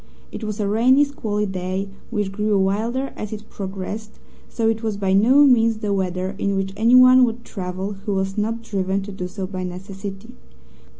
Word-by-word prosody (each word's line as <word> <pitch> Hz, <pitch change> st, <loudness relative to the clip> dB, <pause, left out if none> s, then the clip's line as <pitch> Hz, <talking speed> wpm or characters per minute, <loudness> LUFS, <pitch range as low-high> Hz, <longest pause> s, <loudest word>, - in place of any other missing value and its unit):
It -, -, -7 dB
was 215 Hz, -1 st, -4 dB
a 205 Hz, -, 0 dB
rainy, 250 Hz, +7 st, +4 dB
squally 215 Hz, -7 st, -2 dB
day, 190 Hz, 0 st, -3 dB, 0.2 s
which 210 Hz, -4 st, -2 dB
grew 210 Hz, +1 st, +1 dB
wilder 225 Hz, +8 st, 0 dB
as 210 Hz, -, -6 dB
it 215 Hz, 0 st, -8 dB
progressed, 200 Hz, +3 st, -6 dB, 0.3 s
so 225 Hz, -1 st, -1 dB
it 225 Hz, 0 st, +1 dB
was 220 Hz, -3 st, -2 dB
by 195 Hz, -2 st, 0 dB
no 255 Hz, +9 st, +6 dB
means 230 Hz, -4 st, +4 dB
the 210 Hz, -2 st, -2 dB
weather 185 Hz, 0 st, -2 dB
in 200 Hz, 0 st, 0 dB
which 195 Hz, 0 st, -2 dB
anyone 255 Hz, +3 st, +7 dB
would 235 Hz, 0 st, -1 dB
travel 190 Hz, 0 st, -4 dB
who 200 Hz, +1 st, -4 dB
was 190 Hz, 0 st, -1 dB
not 225 Hz, +2 st, -2 dB
driven 195 Hz, -2 st, -1 dB
to 205 Hz, -, -7 dB
do 185 Hz, -2 st, -5 dB
so 190 Hz, +1 st, -5 dB
by 185 Hz, -1 st, -5 dB
necessity. 195 Hz, +2 st, -7 dB
205 Hz, 185 wpm, -22 LUFS, 190-225 Hz, 0.3 s, anyone